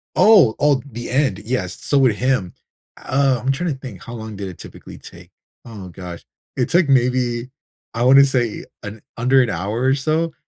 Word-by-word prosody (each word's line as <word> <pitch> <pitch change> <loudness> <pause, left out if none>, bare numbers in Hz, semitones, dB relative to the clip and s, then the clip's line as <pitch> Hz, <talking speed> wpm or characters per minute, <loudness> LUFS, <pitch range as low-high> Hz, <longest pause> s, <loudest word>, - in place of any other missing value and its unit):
Oh, 195 - +6
oh, 145 -2 +2
the 120 +1 -7
end, 135 +2 0
yes. 110 -7 -4
So 145 - 0
with 125 -6 +3
him, 125 -8 -1 0.5
um, 135 -1 +2
I'm 130 +4 -1
trying 165 +5 -2
to 135 - -12
think 110 -10 -10
how 115 - -9
long 110 -2 -7
did 100 -1 -6
it 90 - -11
typically - - -12
take. - - -14 0.4
Oh 105 -5 -9
gosh, 90 -1 -10 0.3
it 125 - 0
took 170 -3 +2
maybe, 125 -2 +1 0.4
I 115 - -2
wanna 135 +2 +7
say, 120 -5 -2 0.2
an 105 +1 -8 0.2
under 130 +3 +3
an 125 - 0
hour 100 +5 -3
or 135 +1 +3
so 155 +4 -1
125 Hz, 190 wpm, -20 LUFS, 110-135 Hz, 0.5 s, wanna